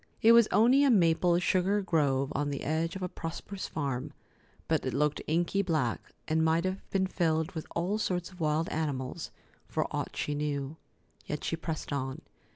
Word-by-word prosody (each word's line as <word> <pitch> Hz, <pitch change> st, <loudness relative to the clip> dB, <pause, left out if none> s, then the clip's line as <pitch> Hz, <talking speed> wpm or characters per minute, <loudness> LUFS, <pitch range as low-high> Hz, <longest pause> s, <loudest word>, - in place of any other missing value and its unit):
It 225 Hz, -, +8 dB
was 235 Hz, -2 st, +7 dB
only 245 Hz, +8 st, +5 dB
a 280 Hz, -, +5 dB
maple 175 Hz, -4 st, +4 dB
sugar 190 Hz, +3 st, +2 dB
grove 140 Hz, -6 st, +1 dB
on 145 Hz, +1 st, -1 dB
the 140 Hz, -, -4 dB
edge 160 Hz, +3 st, -1 dB
of 190 Hz, -, -5 dB
a -, -, 0 dB
prosperous 180 Hz, +3 st, -6 dB
farm, 140 Hz, -6 st, -3 dB, 0.5 s
but -, -, +1 dB
it -, -, -2 dB
looked 150 Hz, 0 st, +1 dB
inky 175 Hz, +5 st, +1 dB
black, 155 Hz, -, 0 dB, 0.3 s
and 160 Hz, +1 st, +2 dB
might 160 Hz, +2 st, +2 dB
have 185 Hz, +1 st, -2 dB
been 190 Hz, -1 st, +1 dB
filled 160 Hz, -2 st, 0 dB
with 160 Hz, -4 st, -6 dB
all 185 Hz, +5 st, 0 dB
sorts 180 Hz, -4 st, -1 dB
of 180 Hz, -, -16 dB
wild 155 Hz, +1 st, +1 dB
animals, 145 Hz, -1 st, -3 dB, 0.4 s
for -, -, -1 dB
aught -, -, -3 dB
she 150 Hz, -, -1 dB
knew. 145 Hz, 0 st, -2 dB, 0.5 s
Yet 150 Hz, -, -4 dB
she -, -, -1 dB
pressed 160 Hz, -2 st, -4 dB
on. 135 Hz, -1 st, -3 dB
165 Hz, 180 wpm, -30 LUFS, 150-185 Hz, 0.5 s, It